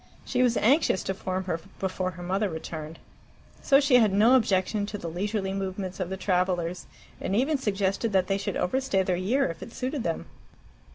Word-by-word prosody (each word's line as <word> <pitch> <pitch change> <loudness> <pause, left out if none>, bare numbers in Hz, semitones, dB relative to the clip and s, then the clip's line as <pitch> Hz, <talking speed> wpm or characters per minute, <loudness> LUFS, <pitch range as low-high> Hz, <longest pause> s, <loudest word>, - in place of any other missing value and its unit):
She 250 - 0
was 245 -2 +3
anxious 260 - +3
to 190 - -2
form 185 0 -3
her 170 -3 -2 0.2
before 185 -1 -1
her 175 - -7
mother 195 +3 0
returned. 160 -1 -6 0.6
So 275 -1 +5
she 275 -3 +5
had 220 -4 +4
no 215 +6 +5
objection 205 -3 +2
to 210 - -5
the 170 - -6
leisurely 195 +3 -2
movements 190 -1 -4
of 180 -2 -2
the 190 - -4
travellers, 180 -2 0 0.3
and 195 - -1
even 275 +6 +2
suggested 200 0 0
that 190 -2 +3
they 195 +1 0
should - - -3
overstay 200 -2 +1
their 185 -1 0
year 225 +10 +1
if 165 -1 -5
it 230 - -9
suited 265 +2 -2
them. 165 -6 -2
195 Hz, 190 wpm, -27 LUFS, 185-225 Hz, 0.6 s, So